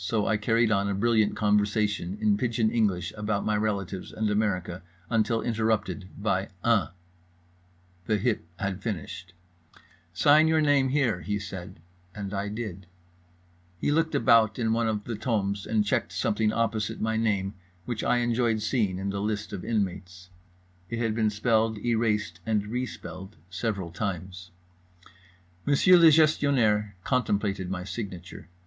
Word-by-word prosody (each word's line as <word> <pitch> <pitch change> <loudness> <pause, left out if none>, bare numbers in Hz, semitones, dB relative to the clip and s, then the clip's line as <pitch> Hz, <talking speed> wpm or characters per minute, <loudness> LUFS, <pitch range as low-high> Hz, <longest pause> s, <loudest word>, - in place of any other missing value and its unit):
—so 105 +3 0
I 110 - +2
carried 115 +2 +2
on 100 -1 +1
a 100 - -1
brilliant 110 0 +2
conversation 105 -2 +1
in 105 -1 +3
pidgeon 115 0 0
English 95 -7 0
about 105 -1 -2
my 105 - +1
relatives 100 -3 -2
and 110 -1 -1
America 95 -4 -1 0.3
until 115 0 +1
interrupted 110 -4 -1
by 100 -2 -1
"Uh." 115 -4 +3 1.2
The 110 - +2
hip 110 +2 0
had 95 -1 -3
finished. 95 -2 -5 0.8
"Sign 145 - +5
your 160 0 +3
name, 145 -3 +3
here," 125 -10 +1
he 105 +4 -2
said, 95 -3 -8 0.3
and 100 -1 -5
I 100 +1 -2
did. 100 -4 -6 0.9
He 145 - 0
looked 160 +1 +1
about 110 -1 +4
in 115 -2 +1
one 115 0 +1
of 105 -2 -1
the 120 - -5
tomes 100 -3 -1
and 110 -1 +1
checked - - 0
something 105 0 +1
opposite 110 -1 -1
my 110 0 0
name, 105 -3 0 0.3
which 120 -3 -3
I 120 - +2
enjoyed 115 -2 +1
seeing 105 -6 0
in 100 +1 -3
the 100 0 -3
list 105 0 -3
of 95 - -5
inmates. 90 -4 -3 0.6
It 115 - -3
had 115 -2 0
been 110 -1 +1
spelled, 110 +1 +1
erased, 105 -5 0
and 105 0 0
re 125 +4 -2
spelled 95 -2 -9 0.2
several 95 -3 -3
times. 90 -1 -5 1.1
Monsieur 145 +6 +5
le 170 -2 +8
Gestionnaire 135 -10 +3
contemplated 100 -7 0
my 90 -1 -3
signature. 95 -5 -7
105 Hz, 150 wpm, -27 LUFS, 100-115 Hz, 1.2 s, le